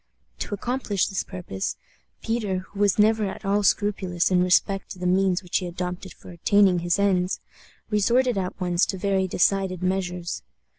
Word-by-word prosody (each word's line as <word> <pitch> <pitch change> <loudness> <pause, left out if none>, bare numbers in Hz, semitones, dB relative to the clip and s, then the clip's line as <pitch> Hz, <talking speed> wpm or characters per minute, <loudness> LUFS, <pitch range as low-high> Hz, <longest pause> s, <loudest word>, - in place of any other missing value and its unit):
To 205 - -3
accomplish 225 -3 -1
this 195 - -2
purpose, 95 - -5 0.5
Peter, 205 -5 -1
who 200 - -10
was 205 -2 +3
never 215 0 +4
at 195 - -6
all 200 +1 +2
scrupulous 195 -4 +1
in 180 -1 +4
respect 195 +2 +2
to 190 - -8
the 180 - -5
means 185 +1 +2
which 180 - 0
he 180 - -3
adopted 180 +1 -5
for - - -13
attaining 185 +1 +3
his 175 0 0
ends, 190 -2 +1 0.5
resorted 240 +5 +3
at 185 -2 -3
once 175 0 +1
to 190 - -3
very 190 0 +1
decided 185 0 +1
measures. 180 -2 -2
190 Hz, 165 wpm, -25 LUFS, 180-205 Hz, 0.5 s, never